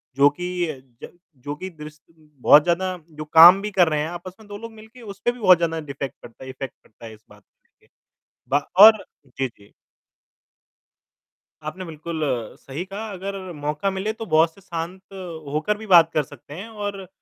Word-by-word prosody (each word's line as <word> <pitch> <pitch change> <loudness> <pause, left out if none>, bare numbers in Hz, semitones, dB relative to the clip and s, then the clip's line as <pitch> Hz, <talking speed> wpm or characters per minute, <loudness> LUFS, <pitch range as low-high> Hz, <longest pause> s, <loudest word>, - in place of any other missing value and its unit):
जो 140 +1 +6
कि 180 +3 -3
अ, 145 -4 -6 0.3
ज - - -13 0.3
जो 145 +1 -4
कि 185 +5 -7
द्रिस 150 -3 -12
बहुत 150 -2 +3
ज़्यादा 185 +2 0
जो 155 -1 -8
काम 175 +4 +9
भी 210 +1 -4
कर 185 -3 +4
रहे 150 - 0
हैं 155 - -3
आपस 175 +1 -8
में 220 - -16
2 205 0 -8
लोग 230 +2 -9
मिलके 220 +3 -15
उसपे 200 +1 -3
भी 245 - -13
बहुत 185 -4 +6
ज़्यादा 165 -1 -1
डिफ़ैक्ट 140 -3 -6
पड़ता 120 - -13
है 130 - -9
इफ़ेक्ट 130 -1 -7
पड़ता 110 - -16
है 110 - -9
इस 110 0 -18
बात - - -18
को - - -65
लेके, - - -34 0.6
ब 145 - +2 0.2
और 215 +1 +9 0.2
जी, 130 +1 -3
जी। 105 -4 -21 2.0
आपने 185 +3 -9
बिल्कुल 160 0 -6 0.4
सही 140 +6 -6
कहा 205 +3 -7
अगर 195 +1 -6 0.2
मौका 150 +5 -2
मिले 195 +3 -3
तो 225 0 -7
बॉस 160 +1 +4
से 195 - -18
शांत 175 0 -6 0.5
होकर 160 +8 0
भी 220 - -9
बात 170 -4 +6
कर 155 - +1
सकते 140 - -14
हैं 190 +8 -8
और 205 -3 -6
170 Hz, 195 wpm, -23 LUFS, 150-195 Hz, 2.0 s, काम